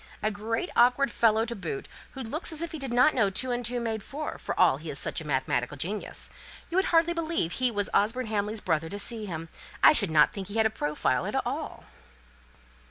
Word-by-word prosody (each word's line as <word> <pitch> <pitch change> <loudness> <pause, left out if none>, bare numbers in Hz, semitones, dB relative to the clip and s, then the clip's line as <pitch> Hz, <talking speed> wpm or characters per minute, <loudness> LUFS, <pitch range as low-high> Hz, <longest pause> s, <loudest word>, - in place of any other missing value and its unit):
A 215 - +2
great 225 - -3
awkward 250 +2 +4
fellow 225 -1 +3
to 235 0 -4
boot, 165 -9 -5 0.3
who 265 - -7
looks 300 +10 -1
as 320 +1 +1
if 335 - -4
he 320 - -6
did 270 -3 -3
not 250 +5 +5
know 215 -6 +3
two 250 +6 +1
and 245 0 -1
two 240 +1 0
made 225 -2 -2
four, 300 +8 -6
for - - -4
all 180 -7 +5
he 155 +2 -8
is 140 - -3
such - - -2
a 155 - -8
mathematical 130 -1 -1
genius. 200 +9 -3 0.4
You 350 - 0
would 380 - +1
hardly 335 0 +3
believe 330 - -1
he 255 +6 +1
was 205 -4 0
Osborne 230 +5 +2
Hamley's 210 0 -2
brother 160 +1 0
to 200 - -5
see 215 +1 -4
him! 165 -2 -5 0.4
I - - +9
should 200 - +1
not 155 -1 +4
think 195 -2 -5
he 205 - -8
has 220 0 +3
a 220 - +2
profile 145 - -1
at - - -1
all." - - -4
220 Hz, 230 wpm, -28 LUFS, 185-255 Hz, 0.4 s, I